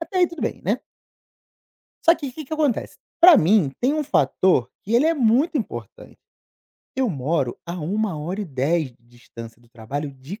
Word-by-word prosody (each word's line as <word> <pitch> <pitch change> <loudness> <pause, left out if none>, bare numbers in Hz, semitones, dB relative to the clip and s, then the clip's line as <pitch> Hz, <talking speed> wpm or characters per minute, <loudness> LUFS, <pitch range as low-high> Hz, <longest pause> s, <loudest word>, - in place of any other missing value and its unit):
até 365 +3 -3
aí 355 - +4
tudo 340 - -8
bem, - - -3
né. - - +1 1.3
Só 335 - +7
que 295 -5 -6
que 310 +4 -8
que 280 - -12
acontece? 295 -6 -1 0.2
Pra 340 -1 +9
mim, 180 - +3
tem 255 +3 +2
um 305 -1 -1
fator 185 - +2
que 210 - -4
ele 260 +7 +4
é 330 - +3
muito 275 +5 +2
importante. 225 - -8 0.8
Eu 265 -2 +1
moro 140 -3 -1
a 170 - -5
1 185 +1 -2
hora 180 +7 -4
e - - -3
10 145 -1 -1
de 120 0 -31
distância 115 -1 -12
do 120 - -24
trabalho 140 +6 -5
de 140 +11 -10
190 Hz, 185 wpm, -22 LUFS, -, 1.3 s, Pra